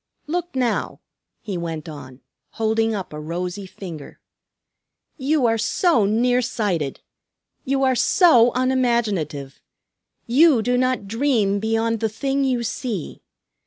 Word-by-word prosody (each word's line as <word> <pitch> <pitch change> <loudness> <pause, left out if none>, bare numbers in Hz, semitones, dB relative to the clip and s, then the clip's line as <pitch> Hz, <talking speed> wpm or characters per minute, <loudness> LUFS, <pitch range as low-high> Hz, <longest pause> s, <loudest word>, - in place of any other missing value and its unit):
"Look 345 0 -3
now!" 250 -2 -1 0.4
he 195 -5 -4
went 165 -1 -5
on, 140 -4 -10 0.3
holding 225 0 0
up 190 -6 -6
a 150 - -6
rosy 180 +5 -4
finger. 170 -6 -10 1.0
"You 285 -1 +1
are 225 -1 +2
so 235 - +2
near 245 +4 +2
sighted! 190 - -2 0.6
You 270 +1 0
are 260 -1 +3
so 245 -3 +5
unimaginative! 230 - 0 0.6
You 265 -1 +4
do 245 +2 +1
not 255 -4 0
dream 225 -4 +1
beyond 225 +1 0
the 220 - 0
thing 275 +5 -1
you 255 -3 0
see. 225 - -4
225 Hz, 125 wpm, -22 LUFS, 190-255 Hz, 1.0 s, so